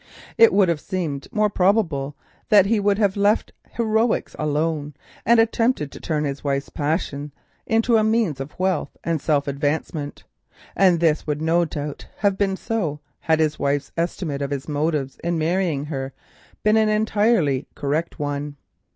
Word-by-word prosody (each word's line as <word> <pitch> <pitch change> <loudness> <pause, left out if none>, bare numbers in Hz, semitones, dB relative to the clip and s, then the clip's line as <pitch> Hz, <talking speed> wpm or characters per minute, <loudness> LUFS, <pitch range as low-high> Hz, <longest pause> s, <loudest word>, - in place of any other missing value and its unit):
It 230 - +7
would 195 -1 +4
have 165 -3 0
seemed 160 -8 -3
more 215 -1 +2
probable 180 -9 +1 0.3
that 205 -3 +7
he 215 +2 +2
would 200 0 +2
have 205 -3 +2
left 205 +2 +2 0.2
heroics 225 0 0
alone 150 -1 -1 0.3
and 235 0 +6
attempted 225 - +1
to - - -10
turn 150 -2 -1
his 140 -1 -3
wife's 140 -1 -2
folly 145 -1 -2 0.4
into 225 +1 +3
a 215 - +3
means 220 - +1
of 135 +2 -7
wealth 185 -3 -1
and 165 -3 -1
self 145 -2 +1
advancement: 145 +1 -2 0.5
and 185 -3 +4
this 160 -2 +1
would 150 -1 -1
no 170 +2 +3
doubt 150 -2 -6
have 200 -2 +2
been 195 -1 0
so 175 -12 -2 0.2
had 160 -1 +2
Mrs. 155 -1 +1
Quest's 140 0 -1
estimate 165 -4 -2
of 140 - -2
his 140 -1 -4
motives 150 -2 -1
in 170 0 0
marrying 160 -3 0
her 135 -3 -4 0.5
been 215 +1 +4
an 220 -1 +3
entirely 210 - +2
correct 150 +4 -2
one. 145 -1 -3
160 Hz, 160 wpm, -22 LUFS, 145-205 Hz, 0.5 s, It